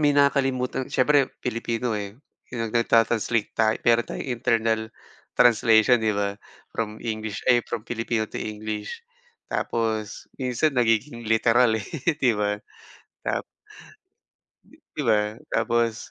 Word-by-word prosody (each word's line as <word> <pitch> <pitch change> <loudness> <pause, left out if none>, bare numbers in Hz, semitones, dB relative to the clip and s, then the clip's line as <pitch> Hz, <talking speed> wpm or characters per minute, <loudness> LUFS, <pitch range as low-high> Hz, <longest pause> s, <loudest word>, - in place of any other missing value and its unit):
may 145 -1 +4
nakakalimutan 135 -3 +1
siyempre 140 +1 +3
Pilipino, 115 +1 -2
eh, 100 -1 -6 0.4
yung 120 - -4
nag - - -11
nag-ta-translate 115 -1 +2
tay 110 -1 +3
meron 120 0 +4
tayong - - -6
internal 115 -2 +1 0.5
translation 115 0 +5
'di 110 -1 +1
ba? 100 0 -1 0.3
From 110 -1 -4
english, 110 -2 -4
ay, 120 -1 +4
from 115 -3 -4
Pilipino 115 -2 -2
to - - -8
English 105 -1 -5 0.5
tapos 110 -2 -2
minsan 130 +4 +1
nagiging 120 +1 +1
literal, 115 +1 +4
eh, 110 - -4 0.4
'di 125 -3 +4
ba? 105 0 0 0.7
Tap - - -1 1.3
di - - -25 0.2
di - - 0
ba? 105 +1 +1 0.2
Tapos, 120 0 0
115 Hz, 125 wpm, -25 LUFS, 110-120 Hz, 1.3 s, translation